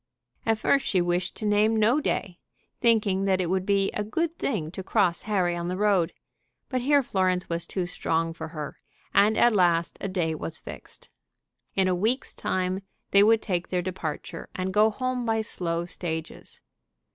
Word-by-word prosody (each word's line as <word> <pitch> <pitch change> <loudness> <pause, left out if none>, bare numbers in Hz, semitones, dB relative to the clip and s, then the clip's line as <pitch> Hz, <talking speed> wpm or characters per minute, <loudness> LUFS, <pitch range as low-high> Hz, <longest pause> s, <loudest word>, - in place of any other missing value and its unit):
At 225 -1 +3
first 275 +5 +2
she 185 - +2
wished 175 +1 0
to 215 - -6
name 210 +2 +3
no 225 +7 +4
day, 185 -9 -2 0.4
thinking 210 -5 +3
that 190 -1 +2
it 180 -1 0
would 190 0 0
be 195 -1 +2
a 210 - -2
good 325 +10 -1
thing 165 - -2
to 190 - -6
cross 185 -3 +1
Harry 180 -4 +1
on 170 0 -3
the 180 +1 -2
road. 200 -5 +2 0.6
But 255 -2 -1
here 285 +2 +4
Florence 185 -5 0
was 170 0 -2
too 185 -2 -2
strong 165 -1 -1
for 160 0 -6
her, 155 -2 -7 0.3
and 210 +2 +4
at 240 - +5
last 175 -4 +2
a - - -2
day 175 -4 -1
was 160 +1 -5
fixed. - - -11 0.7
In 190 -1 +3
a 185 - +2
week's 220 +9 0
time 185 +1 -1 0.3
they 200 - +6
would 220 +1 +5
take 175 -3 -1
their 180 -1 -1
departure 175 -4 -5
and 185 0 -2
go 210 +2 +5
home 255 +2 -2
by 225 -1 +1
slow 170 -5 -2
stages. 160 -2 -6
190 Hz, 180 wpm, -26 LUFS, 175-215 Hz, 0.7 s, they